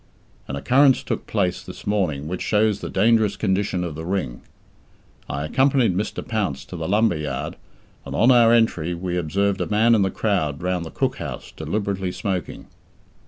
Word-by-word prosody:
An 70 - -4
occurrence 130 - +4
took - - -4
place 90 -1 0
this - - -11
morning 90 -9 -1
which 90 +2 -4
shows 105 -1 +2
the - - -6
dangerous 110 0 +3
condition 95 -3 0
of 85 -3 -4
the 80 +2 -7
Ring. 90 -9 -3 0.9
I 70 +2 -3
accompanied 130 - +2
Mr. 105 +3 -3
Pounce 95 - -2
to 90 - -9
the 80 -2 -4
Lumber 105 -3 +3
Yard, 75 0 -4 0.5
and, - - -6
on 120 +4 +5
our 120 -2 +6
entry, 90 -8 +2
we 90 +1 -3
observed 95 +4 0
a - - -1
man 110 +3 +4
in 110 - +4
the 95 - +2
crowd 90 -7 -1
round 90 -1 -1
the - - -7
cook - - -1
house - - -7
deliberately 100 -3 -2
smoking. 90 -3 -4
95 Hz, 175 wpm, -22 LUFS, 85-110 Hz, 0.9 s, our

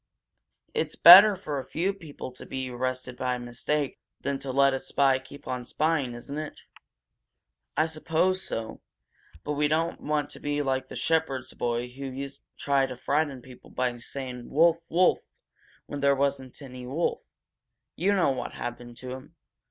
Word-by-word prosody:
"It's 155 -1 -1
better 195 +4 +11
for 150 -7 -4
a - - -5
few 180 +8 -1
people 155 -8 -9
to 125 - -11
be 130 -1 -4
arrested 125 0 -3
by 125 -1 -1
mistake 125 +4 -2 0.2
than 140 -1 -2
to 135 -1 -4
let 140 +1 +4
a 135 - -1
spy 135 -1 +2
keep 140 +2 -13
on 125 -1 -3
spying, 145 -2 0
isn't 140 +5 -6
it?" 155 -1 -7 1.2
"I 155 - +4
suppose 165 +4 0
so, 115 -8 -4 0.6
but 150 - -3
we 150 +1 +2
don't 165 +3 0
want 150 -1 -1
to - - -9
be 145 0 -1
like 130 -1 -1
the - - -9
shepherd's 160 -6 0
boy 120 0 -1
who 135 +3 -8
used 135 +1 -6
to - - -15
try 140 -1 +3
to 130 - -7
frighten 140 -2 -1
people 130 -1 -14
by 125 -1 -1 0.2
calling 125 -3 -6
'Wolf! 165 +3 +4
Wolf!' 180 +2 +3 0.6
when 145 - -6
there 140 0 +4
wasn't 135 -2 -1
any 125 -2 -9
wolf. 155 +7 -1 0.7
You 200 +4 +2
know 180 -7 +3
what 130 -2 -4
happened 120 0 -7
to 130 -1 -6
him. 130 +5 -9
140 Hz, 170 wpm, -27 LUFS, 130-155 Hz, 1.2 s, better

